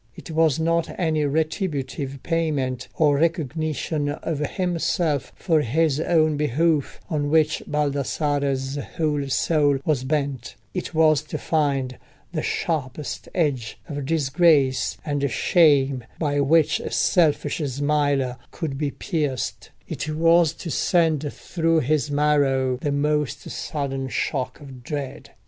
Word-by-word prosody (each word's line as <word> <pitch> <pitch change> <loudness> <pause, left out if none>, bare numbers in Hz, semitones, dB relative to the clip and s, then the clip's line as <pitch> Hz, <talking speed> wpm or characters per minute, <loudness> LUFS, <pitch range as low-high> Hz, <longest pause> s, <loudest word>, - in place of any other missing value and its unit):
It - - -10
was 160 -2 +2
not 165 +1 +1
any 160 -4 +1
retributive 145 -3 -2
payment 145 -7 -1
or 145 -3 +3
recognition 155 -2 -1
of 145 +1 -3
himself 165 -2 -1
for 160 -4 +1
his 150 +3 +1
own 155 -2 +2
behoof, 150 +1 +1
on 145 -3 -1
which 155 0 +2
Baldassarre's 145 -1 -1 0.2
whole 150 -3 0
soul 145 0 +2
was 145 -5 +1
bent: 140 -3 -2 0.2
it 180 -2 -4
was 155 -2 +4
to - - -4
find 140 -5 0 0.3
the - - -1
sharpest 145 -3 -3
edge 140 -10 0
of 145 -4 -5
disgrace 145 -3 +2
and 145 -2 0
shame 140 -5 +3
by 145 -3 0
which 150 +2 +3
a - - -5
selfish 150 -3 +2
smiler 140 -2 0
could 140 -4 -5
be 150 -2 0
pierced; 145 -4 -3 0.2
it 155 - -4
was 165 +1 +4
to 165 - -7
send 155 -5 +1
through 165 -2 0
his 150 +2 0
marrow 140 -3 +2
the 145 +2 -2
most 150 0 -1
sudden 135 -3 -3
shock 130 -1 -2
of 135 -3 -11
dread. 140 +1 -5
150 Hz, 125 wpm, -23 LUFS, 140-160 Hz, 0.3 s, was